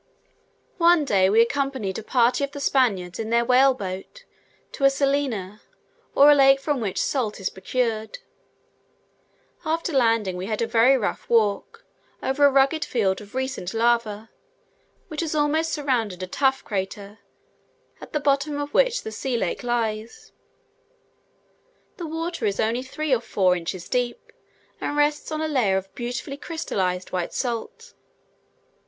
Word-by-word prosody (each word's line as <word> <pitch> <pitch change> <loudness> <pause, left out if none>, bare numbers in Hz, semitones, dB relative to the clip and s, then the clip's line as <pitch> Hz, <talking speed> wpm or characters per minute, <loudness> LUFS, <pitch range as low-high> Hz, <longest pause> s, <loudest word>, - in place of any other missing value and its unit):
One 340 -2 +5
day 190 -6 +3
we 220 +3 +5
accompanied 260 -6 -2
a - - -9
party 245 +3 +2
of 280 0 -3
the 285 - -6
Spaniards 200 -11 +1
in 220 -1 -3
their 235 +1 +2
whale 260 +2 +5
boat 195 - -7 0.5
to 275 - -7
a 275 - +8
salina, 275 -8 -1 0.5
or 290 +1 +8
lake 270 -1 +5
from 280 -2 -1
which 200 -4 -2
salt 230 -7 -1
is 190 - -2
procured. 220 - -2 1.5
After 330 0 -2
landing, 225 -7 +2
we 185 +2 -5
had 215 -1 -2
a 230 - +1
very 230 +4 +4
rough 215 - -3
walk 230 - +1 0.4
over 270 +2 0
a 285 - +8
rugged 275 +4 +3
field 200 - 0
of 205 +3 -14
recent 260 -7 -3
lava, 225 -2 0 0.8
which 310 0 -4
has 315 -2 -2
almost 310 +2 +1
surrounded 235 - -1
a - - -1
tuff 265 +8 0
crater, 200 +1 -5 0.8
at - - -10
the 300 - 0
bottom 285 +1 0
of 290 0 -5
which - - +2
the 220 - -6
salt 245 +3 -2
lake 185 - -2
lies. 230 -2 -3 1.7
The 345 - -5
water 330 0 -3
is 200 - -2
only 225 +3 +1
three 285 +2 -2
or 240 - +2
four 185 -5 +2
inches 175 +1 -5
deep, 245 -1 -2 0.5
and 290 - -2
rests 295 +1 +1
on 310 0 -2
a 315 - 0
layer 240 -11 +2
of 190 0 -6
beautifully 245 +3 -5
crystallized, 190 - -3
white 180 -2 -3
salt. 255 - -4
245 Hz, 150 wpm, -24 LUFS, 210-285 Hz, 1.7 s, a